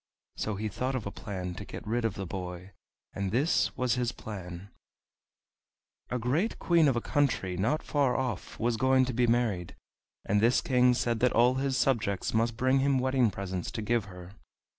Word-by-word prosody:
So 110 - -2
he 110 +2 -3
thought 125 +6 -2
of 125 - -3
a 100 - -4
plan 90 -4 -5
to 105 - -7
get - - -9
rid 115 +2 -1
of 115 - -1
the 95 - -4
boy, 90 +1 -6 0.4
and 100 -1 -2
this 140 +9 +1
was 125 -2 +1
his 125 -1 0
plan: 95 -4 -8 1.4
A 125 - -1
great 140 - 0
Queen 170 -3 +3
of 135 - +2
a 120 - 0
country 125 - 0
not 115 - 0
far 140 -4 +1
off 125 -8 -4
was 115 0 +1
going 130 +2 +4
to 130 - -3
be 120 +1 +2
married, 115 -7 0 0.5
and 100 +1 +2
this 120 +3 +4
king 125 -1 +3
said 120 -2 0
that 125 +1 +3
all 120 +2 +5
his 135 -1 0
subjects 110 -7 0
must 115 0 +1
bring 130 +2 +3
him 135 0 +2
wedding 130 -2 +2
presents 95 -2 -4
to 110 - -3
give 115 -1 +1
her. 90 -2 -11
115 Hz, 190 wpm, -29 LUFS, 100-130 Hz, 1.4 s, all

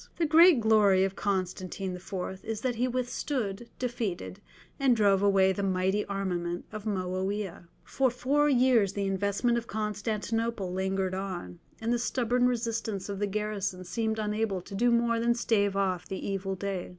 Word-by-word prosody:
The 340 - +1
great 325 -1 +7
glory 210 -4 +5
of 195 0 -1
Constantine 185 -1 -2
IV. 185 +1 -6
is 220 -1 -4
that 255 -1 0
he 240 +2 0
withstood, 245 -3 -3
defeated, 210 - -3 0.4
and 265 -3 +4
drove 200 -3 +3
away 195 -1 +4
the 200 - -3
mighty 190 +1 +1
armament 180 -3 -3
of 215 -1 -7
Moawiah. 190 -1 -3 0.2
For 265 -1 +1
four 280 +5 +1
years 245 -7 +4
the 200 0 -2
investment 200 +5 +1
of 235 - -12
Constantinople 215 -1 -2
lingered 190 0 -1
on, 185 - -5 0.2
and 230 +2 0
the 240 - +1
stubborn 245 0 +1
resistance 225 -5 -2
of 200 -1 -4
the 205 - 0
garrison 200 -2 -3
seemed 220 +4 -2
unable 210 -2 -1
to 190 - -12
do 240 +5 +2
more 235 -1 +2
than 235 +1 +2
stave 205 -4 +1
off 185 -3 0
the 190 - -5
evil 195 -1 -2
day. 190 -1 -4
205 Hz, 160 wpm, -29 LUFS, 190-235 Hz, 0.4 s, great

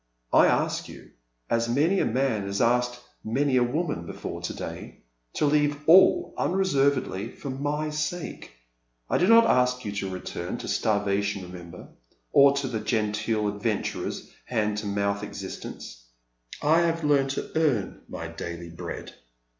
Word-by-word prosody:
I - - +7
ask - - 0
you, - - -12 0.4
as 115 0 0
many 155 +10 +2
a - - +2
man 115 -5 0
has 100 0 -2
asked 125 +1 +2 0.2
many 130 +5 +1
a 125 - +4
woman 145 - -2
bef - - -9
oi"e - - -4
to - - -4
day, - - -8 0.3
to - - +1
leave 145 0 +2
all 185 +4 +6
unreservedly 140 - +1
for 140 - -6
my 145 +3 -2
sake^ 155 +3 -4 0.6
I - - +3
do 180 - +3
not 230 +1 +7
ask 125 - +2
you 105 - -2
to 100 -1 -3
return 95 -1 -5
to - - -7
starvation 100 -1 0
remember, 90 -1 -10 0.4
or 140 0 +7
to 140 -1 -1
the 115 -4 -2
genteel 110 0 0
adventurer's 105 +1 -3
hand 105 -3 0
to 105 - -5
mouth 100 0 0
existence. 95 -11 -8 0.6
I 155 +3 +5
have 165 -1 +1
learned 140 -2 +3
to - - -4
earn 145 -11 0
my 85 - -5
daily 85 0 -7
bread. 85 - -7
120 Hz, 155 wpm, -26 LUFS, 100-145 Hz, 0.6 s, I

